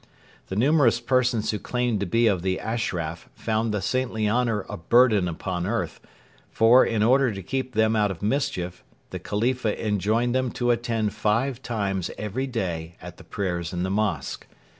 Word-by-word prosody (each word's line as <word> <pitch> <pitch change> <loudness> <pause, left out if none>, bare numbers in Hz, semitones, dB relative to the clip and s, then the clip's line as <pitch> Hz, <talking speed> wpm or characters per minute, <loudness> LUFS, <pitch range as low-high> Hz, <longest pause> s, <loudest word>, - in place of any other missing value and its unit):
The 95 - -5
numerous 130 0 +4
persons 125 -2 +1
who 105 - -3
claimed 125 -3 -1
to 100 - -2
be 115 +7 +2
of 100 -6 +2
the 95 +1 -1
'Ashraf' 90 -8 -3
found 110 0 -1
the 105 -2 -2
saintly 120 -2 0
honour 115 -2 +1
a - - -5
burden 110 +1 +4
upon 90 +1 -3
earth; 105 -7 -2 0.5
for, 115 +3 +6
in 110 -2 +1
order 130 +2 +4
to 95 -2 -7
keep 130 +4 -3
them 110 0 +3
out 105 -1 +2
of 95 -1 -6
mischief, 95 -7 -1 0.3
the - - -5
Khalifa 115 +1 -1
enjoined 110 +4 +1
them 130 -1 +1
to 120 -1 +1
attend 115 -3 -1
five 115 +5 0
times 100 -7 -2
every 105 +6 -3
day 85 -9 -3
at - - -10
the - - -13
prayers 90 -3 -3
in 90 0 -2
the 95 - -1
mosque. 100 -9 -2
110 Hz, 175 wpm, -25 LUFS, 95-120 Hz, 0.5 s, for